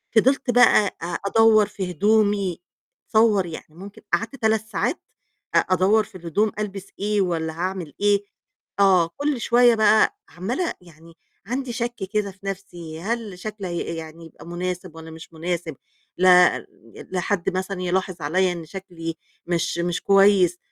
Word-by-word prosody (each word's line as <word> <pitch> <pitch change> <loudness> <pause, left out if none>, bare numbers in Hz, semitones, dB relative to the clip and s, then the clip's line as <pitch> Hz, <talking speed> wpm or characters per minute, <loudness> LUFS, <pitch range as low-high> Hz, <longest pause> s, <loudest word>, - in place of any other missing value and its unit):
فضلت 255 +3 +3
بقى 245 -4 +4
أ - - -2 0.2
أدوَّر 220 +1 +5
في 190 -2 -5
هدومي، 205 -1 +2 0.5
تصوَّر، 215 -4 +4
يعني 165 -2 -8
ممكن 195 +3 -11
قعدت 230 +5 0
3 220 -3 +1
ساعات 225 - -1 0.6
أ - - +6
أدوَّر 190 +4 +3
في 210 -1 -17
الهدوم 185 +5 0
ألبس 200 -2 -5
إيه 210 0 +1
والّا 165 -3 -1
هاعمل 180 -1 -4
إيه، 205 0 +3 0.6
آه، 185 -4 +5
كل 285 -3 -1
شوية 240 0 +5
بقى 220 - +4
عَمّالة 240 - -3
يعني 165 -1 -17 0.3
عندي 250 +1 -3
شَك 240 0 -3 0.2
كده 210 -2 0
في 190 - -23
نَفْسي، 175 -5 -7
هل 215 -2 -4
شكلي 210 -1 -6
هي 170 -1 -3
يعني 165 +1 -9
يبقى 165 - -14
مناسب 180 0 -5
والّا 160 0 -10
مش 160 +1 -12
مناسب؟ 165 -1 -3 0.4
لأ، 180 -1 +6
ال - - -12 0.4
لحد 185 0 -1
مثلًا 190 0 -3
يلاحظ 185 +1 -1
عليّا 180 +5 +1
إن 170 -2 -7
شكلي 165 -2 -7 0.3
مش 170 -1 -1
مش 175 0 -1
كويس، 195 -3 +4
190 Hz, 150 wpm, -23 LUFS, 175-215 Hz, 0.6 s, أ